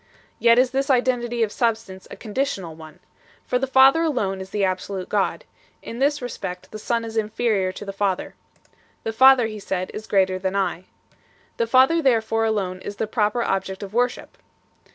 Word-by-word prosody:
Yet 235 0 +5
is 255 0 +4
this 270 +2 -1
identity 240 -2 +1
of 215 - -1
substance 225 -6 -2
a - - -8
conditional 210 - -3
one, 155 0 -13 0.4
for 250 - 0
the 270 - -1
Father 265 +4 +6
alone 205 -12 -1
is 190 - -8
the 205 0 -1
absolute 185 0 -3
God; 205 -2 -1 0.4
in 230 - -7
this 290 0 +1
respect 180 -7 -6
the 215 - -7
Son 230 +1 -1
is 225 0 -6
inferior 215 -3 0
to 205 - -8
the 195 - -6
Father. 195 -2 -1 0.7
The 225 - -3
Father, 260 +1 +6
He 215 -1 -5
said, 185 -2 -3
is 215 +1 -7
greater 190 -2 +2
than 190 +1 -2
I. 185 -2 -1 0.7
The 230 - 0
Father 265 +7 +4
therefore 225 -4 +2
alone 195 -4 -1
is 205 - -6
the 220 - -2
proper 215 +1 0
object 190 -1 -2
of 200 0 -8
worship. 245 - -1
220 Hz, 180 wpm, -23 LUFS, 195-245 Hz, 0.7 s, Father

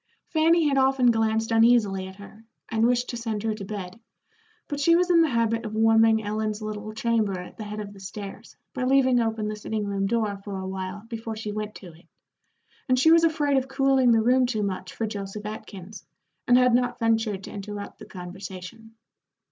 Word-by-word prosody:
Fanny 325 0 +3
had 275 -1 +2
often 265 -2 +4
glanced 225 0 0
uneasily 225 -5 +3
at 190 - -11
her, 205 +2 -14 0.3
and 225 0 +2
wished 245 0 +1
to 240 - -4
send 225 -3 -3
her 220 -1 0
to 210 -1 -7
bed, 195 0 -7 0.7
but 290 - -4
she 335 +4 +4
was 360 +1 +2
in 335 -1 +6
the 325 - +3
habit 230 -1 0
of 215 -1 -5
warming 225 0 +4
Ellen's 215 0 -2
little 215 0 -5
chamber 220 -3 0
at 180 - -9
the 220 - -6
head 210 +1 -6
of 205 -1 -7
the 200 - -14
stairs 195 +1 -9 0.2
by 255 - -3
leaving 260 -1 +4
open 225 -2 -1
the 215 - -3
sitting 210 0 -3
room 195 -1 -1
door 215 -2 0
for 200 -1 -5
a 190 0 -5
while 190 +2 -5
before 225 -1 -5
she 215 -1 -5
went 210 0 -5
to 175 -4 -11
it, 165 +3 -20 0.8
and 255 - +4
she 320 +6 +5
was 335 0 +6
afraid 295 -4 +2
of 265 0 0
cooling 270 -1 +3
the 225 -1 +4
room 250 +2 +3
too 220 -4 -1
much 185 -2 -4
for 225 - -3
Joseph 205 0 -6
Atkins, 210 -2 -8 0.4
and 245 - +6
had 250 -1 +4
not 245 0 +1
ventured 225 -4 0
to - - -8
interrupt 205 0 -7
the - - -10
conversation. 190 +4 -9
220 Hz, 205 wpm, -25 LUFS, 205-245 Hz, 0.8 s, in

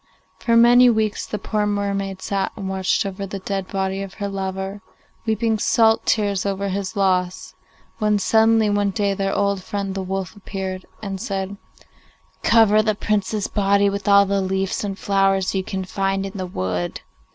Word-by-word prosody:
For 230 -1 +2
many 245 +1 +7
weeks 220 -2 0
the 210 - -3
poor 210 0 -1
mermaid 200 -2 -2
sat 195 -1 -1
and 195 -3 -5
watched 190 +1 0
over 195 0 -4
the 195 - -5
dead 195 0 -3
body 195 -1 -2
of 195 -1 -7
her 200 -2 -3
lover, 195 0 -4 0.5
weeping 220 0 +1
salt 225 +1 +3
tears 200 -3 +1
over 200 0 -2
his 195 +2 -3
loss, 185 -2 0 0.5
when 210 -1 +2
suddenly 220 +2 +3
one 205 -1 +1
day 200 0 0
their 195 0 -1
old 200 -1 0
friend 200 -1 -3
the 195 - -3
wolf 190 +1 -4
appeared 190 -2 -6 0.2
and 195 -2 -4
said, 195 0 -3 0.9
'Cover 215 -2 +5
the 215 -1 0
Prince's 210 0 -1
body 200 -1 +2
with 200 0 -5
all 200 0 +6
the 200 0 0
leaves 190 +1 -1
and 195 -2 -3
flowers 195 -1 +1
you 190 -1 0
can 190 0 -4
find 195 +1 -1
in 195 - -6
the 185 -2 -4
wood. 90 - -3
195 Hz, 175 wpm, -21 LUFS, 190-205 Hz, 0.9 s, many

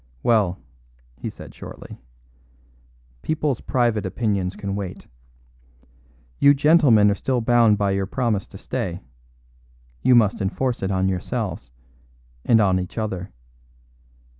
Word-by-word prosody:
"Well," 105 -6 +2 0.6
he - - -6
said - - -12
shortly, - - -11 1.2
"people's 150 -5 -1
private 120 -4 0
opinions 100 -5 -2
can 100 -1 -4
wait. 95 -3 -6 1.3
You 140 0 +6
gentlemen 140 -9 +5
are - - +2
still 125 +5 -1
bound 115 -2 +4
by 100 -1 +1
your 95 0 -1
promise 110 -3 -1
to - - -12
stay; - - -4 1.0
you 125 - +5
must 110 -3 +3
enforce 120 +6 -1
it 95 - -1
on 95 -1 +1
yourselves 95 - -3 0.7
and 115 - +4
on 95 -3 +3
each 90 +4 -7
other. 95 -5 -4
105 Hz, 120 wpm, -22 LUFS, 95-120 Hz, 1.3 s, You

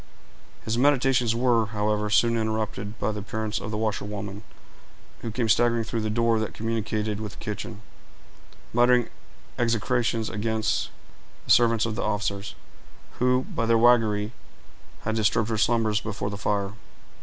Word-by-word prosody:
His 115 +2 -1
meditations 130 -4 +3
were, 120 -2 +2
however, 105 0 -1
soon 115 +2 +3
interrupted 110 -1 -2
by - - -1
the 105 - -5
appearance 110 +2 -3
of - - -5
the 105 - -3
washerwoman, 105 -2 -3 0.8
who 115 - -5
came 115 +1 -1
staggering 115 +1 +3
through 115 0 -3
the 110 - -2
door 115 +1 +2
that 110 - -3
communicated 110 -1 -2
with 105 -2 -5
the - - -15
kitchen, 105 0 -6 0.9
muttering 120 0 +4 0.5
execrations 115 -1 +1
against 110 0 -1 0.6
the - - -1
servants 115 -2 +5
of 115 - -2
the - - -3
officers, 100 -2 -2 0.6
who, 125 +1 +2
by 115 - -1
their 115 0 +4
waggery, 110 -3 +3 0.7
had 110 - -2
disturbed 110 0 +1
her 115 - 0
slumbers 110 -2 +2
before 105 -1 -4
the - - -4
fire. 100 -1 -1
110 Hz, 145 wpm, -26 LUFS, 105-115 Hz, 0.9 s, servants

